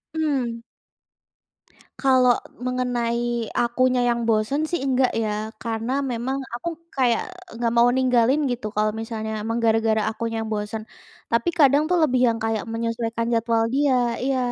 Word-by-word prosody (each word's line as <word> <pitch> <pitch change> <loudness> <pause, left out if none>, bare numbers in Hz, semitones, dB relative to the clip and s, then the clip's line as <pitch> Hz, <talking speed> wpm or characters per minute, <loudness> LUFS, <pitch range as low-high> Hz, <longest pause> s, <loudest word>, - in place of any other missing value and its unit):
Hmm. 270 -7 -1 1.4
Kalau 255 -2 +4 0.3
mengenai 240 -2 -1
akunya 250 +1 +2
yang 235 0 0
bosen 220 +7 +1
sih, 345 - -1
enggak 260 -1 +2
ya, 215 -1 -2
karena 225 +1 -3 0.2
memang 245 +3 -2 0.2
aku 290 +8 -3 0.2
kayak 245 -4 +2 0.4
nggak 235 -1 0
mau 240 +1 +6
ninggalin 255 +1 +3
gitu, 235 -3 -3
kalau 215 0 0
misalnya 220 -1 -4
memang 225 +2 -2
gara-gara 225 -1 +2
akunya 225 +1 -4
yang - - -6
bosen. 215 +1 -4 0.5
Tapi 235 +8 +2
kadang 300 -2 +3
tuh 360 - +3
lebih 255 -3 +1
yang 230 - -1
kayak 225 0 -2
menyesuaikan 230 0 -2
jadwal 230 0 +2
dia 255 -4 +2
iya, 265 +1 0
235 Hz, 140 wpm, -23 LUFS, 225-255 Hz, 1.4 s, mau